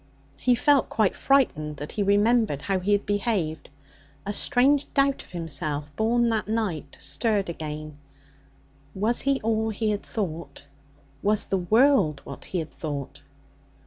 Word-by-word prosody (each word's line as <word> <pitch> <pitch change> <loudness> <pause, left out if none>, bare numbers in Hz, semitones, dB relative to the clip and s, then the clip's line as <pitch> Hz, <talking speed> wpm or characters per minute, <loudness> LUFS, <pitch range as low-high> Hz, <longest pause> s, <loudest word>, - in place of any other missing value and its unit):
He 250 -1 +3
felt 280 +1 +3
quite 215 -4 +2
frightened 155 - +1
when 145 +2 -6
he 210 - -3
remembered 205 - +2
how 195 -1 0
he 200 +3 +1
had 205 - +1
behaved. 200 -6 -1 0.6
A 205 - -2
strange 280 +5 +2
doubt 275 -1 +2
of - - -17
himself, 155 -3 -3
born 235 +2 +2
that 220 -2 -1
night, 195 -10 -2
stirred 195 +8 0
again. 155 -2 -6 1.0
Was 215 +5 +1
he 275 -1 +1
all 220 0 +1
he 215 0 -1
had 205 - -2
thought? 170 -8 -5 0.6
Was 210 +1 +1
the 195 - 0
world 215 - +3
what 140 - -9
he 185 - -4
had 160 -3 -4
thought? 145 -2 -6
205 Hz, 145 wpm, -25 LUFS, 155-230 Hz, 1.0 s, He